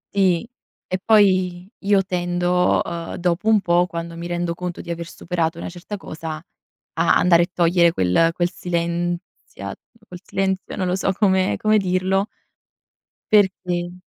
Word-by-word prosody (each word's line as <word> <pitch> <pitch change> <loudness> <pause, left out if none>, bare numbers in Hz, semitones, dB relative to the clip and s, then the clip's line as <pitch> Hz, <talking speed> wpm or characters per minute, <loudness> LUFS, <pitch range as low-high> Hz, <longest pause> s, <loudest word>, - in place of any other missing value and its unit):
Sì, 190 +1 +2 0.4
e 185 - -2
poi 185 -4 +3
io 200 -1 +2
tendo, 180 0 +1
uhm, 170 -1 -5
dopo 175 +3 -1
un 215 -2 +5
po', 175 0 +2
quando 170 0 -6
mi 170 +1 -6
rendo 175 -1 -2
conto 180 0 -5
di 170 - -6
aver 170 0 -5
superato 165 -1 -2
una - - -5
certa 180 +3 -7
cosa, 160 -4 -6
a 165 +1 -3
andare 175 -1 +5
e 175 - -4
togliere 170 -1 +3
quel 95 - +3
quel 175 +1 0
silenzia 175 0 -4 0.3
quel 180 -1 -10
silenzio, 190 0 -2
non 190 - -1
lo 180 0 0
so 190 0 0
come 190 -2 +2
come 215 0 +3
dirlo 190 +1 0 1.0
perché 180 -4 +2
180 Hz, 150 wpm, -21 LUFS, 170-190 Hz, 1.0 s, un